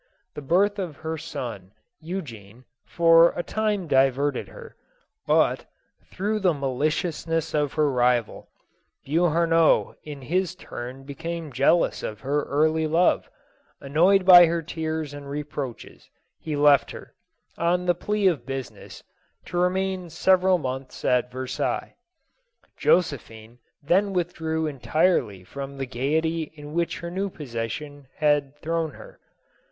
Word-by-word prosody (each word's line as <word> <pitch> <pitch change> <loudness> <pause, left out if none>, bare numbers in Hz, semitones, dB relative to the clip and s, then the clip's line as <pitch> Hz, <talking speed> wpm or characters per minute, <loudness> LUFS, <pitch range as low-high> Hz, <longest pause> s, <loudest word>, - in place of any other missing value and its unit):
The - - -7
birth 200 +8 +2
of 175 -6 -4
her 160 0 -4
son 120 - -7 0.3
Eu 180 +5 -4
gene, 115 -2 -13 0.2
for 165 0 +5
a 175 - -1
time 210 -3 -1
diverted 135 +1 +2
her, 475 -2 -12 0.5
but, - - +2 0.4
through 210 +3 -2
the 180 -5 +2
ma 140 -1 -2
liciousness 155 +4 -1
of 150 -2 0
her 155 -1 +2
rival, 125 -2 0 0.6
Beauharnois 165 +1 +3
in 145 -3 -9
his 180 +5 -1
turn 130 -4 -8
became 160 +3 -6
jealous 140 +7 +2
of 105 - -6
her 145 +2 0
early 155 +2 +1
love; 170 +3 +2 0.5
annoyed 180 +7 +3
by 175 -2 +10
her 165 0 -1
tears 160 -2 -4
and 145 -1 -9
reproaches, 145 -3 -6 0.3
he 155 -2 -4
left 145 -1 +4
her, - - -10 0.4
on 175 +2 0
plea 210 +3 -2
of 175 -6 +2
business, 135 -2 -7 0.4
to 175 - -3
remain 185 0 0
several 185 +2 +3
months 130 -3 -6
at 125 0 +2
Versailles. 130 0 -3 0.8
Josephine 120 -8 0 0.2
then 195 +6 +2
withdrew 160 -3 -2
entirely 145 - 0
from 140 +7 -8
the 135 - -3
gayety 155 +6 -1
in 150 0 -10
which 170 0 -1
her 170 0 -6
new 195 +2 -2
position 140 - -6
had 145 -2 +1
thrown 165 0 -1
her. - - -14
155 Hz, 130 wpm, -25 LUFS, 135-175 Hz, 0.8 s, by